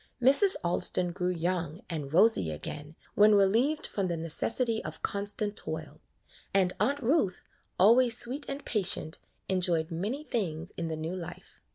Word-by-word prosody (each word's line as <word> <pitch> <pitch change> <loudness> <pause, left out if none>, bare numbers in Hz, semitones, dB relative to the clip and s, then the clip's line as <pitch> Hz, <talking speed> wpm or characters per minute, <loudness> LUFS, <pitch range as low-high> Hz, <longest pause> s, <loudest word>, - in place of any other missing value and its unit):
Mrs. 280 - +6
Alston 175 0 0
grew 180 0 -2
young 175 -1 -2
and 150 -5 -5
rosy 185 - +4
again 145 - -7 0.2
when 210 0 +5
relieved 230 +11 +2
from 195 -2 -2
the 170 -1 -2
necessity 225 +8 0
of 155 +1 -8
con 200 0 -2
stant 205 0 -1
toil, 155 -3 -5 0.5
and 185 -2 +3
Aunt 280 0 0
Ruth, 240 - +1 0.4
always 235 +4 +5
sweet 270 +5 -1
and 275 +1 -6
patient, 190 -6 0 0.3
enjoyed 175 -3 0
many 210 - -3
things 170 - -3
in 165 - -4
the 160 -1 -4
new 160 +3 -4
life. 175 -1 -10
185 Hz, 155 wpm, -29 LUFS, 165-230 Hz, 0.5 s, Mrs